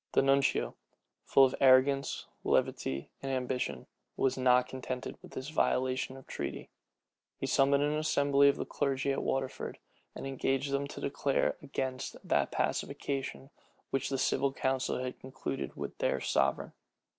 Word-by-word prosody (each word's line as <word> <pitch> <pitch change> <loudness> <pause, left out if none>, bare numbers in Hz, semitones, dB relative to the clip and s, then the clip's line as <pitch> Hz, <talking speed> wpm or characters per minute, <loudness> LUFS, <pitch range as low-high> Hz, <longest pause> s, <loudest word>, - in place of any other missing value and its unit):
The - - +4
nuncio, 135 0 +2 0.5
full 135 - +6
of 130 - 0
arrogance, 135 +1 +4 0.2
levity, 70 +1 0
and 135 - -3
ambition, 125 - -2 0.3
was 135 - +2
not 125 -1 +4
contented 130 -1 -5
with - - -13
this 130 +3 -5
violation 130 -3 0
of 135 - -13
treaty. - - -5 0.7
He - - -3
summoned 140 +1 +3
an 150 +1 +1
assembly 140 -2 +4
of 140 - +2
the - - -3
clergy 140 -1 0
at 135 - -1
Waterford, 135 -1 -2 0.4
and - - -6
engaged 135 +1 -1
them 140 +1 0
to 145 - -8
declare 140 0 +1
against 130 -1 -3
that - - +2
pacification 135 0 -2 0.4
which 135 - 0
the 135 - 0
civil 135 +1 +1
council 130 -1 0
had 130 0 -5
concluded 135 +1 -5
with - - -5
their - - +1
sovereign. 70 0 0
135 Hz, 145 wpm, -31 LUFS, 130-140 Hz, 0.7 s, full